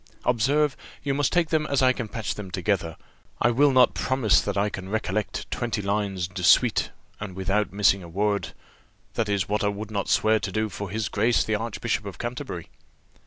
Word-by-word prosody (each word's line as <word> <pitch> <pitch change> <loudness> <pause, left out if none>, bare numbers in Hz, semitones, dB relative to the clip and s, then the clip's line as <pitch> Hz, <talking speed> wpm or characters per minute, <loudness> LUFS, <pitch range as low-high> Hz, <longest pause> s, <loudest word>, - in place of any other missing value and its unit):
Observe, 135 +4 +2 0.3
you 140 -1 0
must 145 0 +1
take 175 -3 +2
them 155 -1 +1
as 140 -2 +1
I 130 0 +5
can 120 -3 -4
patch 110 0 -3
them 105 -3 -7
together; 90 -3 -1 0.4
I 120 - +3
will 145 +5 +4
not 130 -2 +5
promise 130 -5 +2
that 100 -1 -3
I 100 +1 +2
can 95 -2 -6
recollect 105 -1 -2
twenty 120 -3 -2
lines 100 -3 -1
de 90 0 -7
suite, - - +4 0.3
and 100 -3 -6
without 100 +2 0
missing 100 -1 +3
a 85 - -10
word; 100 +3 -1 0.6
that 110 -2 -1
is 100 -2 0
what 105 +1 0
I - - +2
would 105 +1 -4
not 100 -2 -2
swear 110 0 +3
to 95 - -4
do 110 +2 -1
for 100 +1 -6
His 110 +1 -2
Grace 115 +3 +2
the 110 - -2
Archbishop 110 0 -2
of 100 - -7
Canterbury." 120 - -5
105 Hz, 200 wpm, -25 LUFS, 100-120 Hz, 0.6 s, I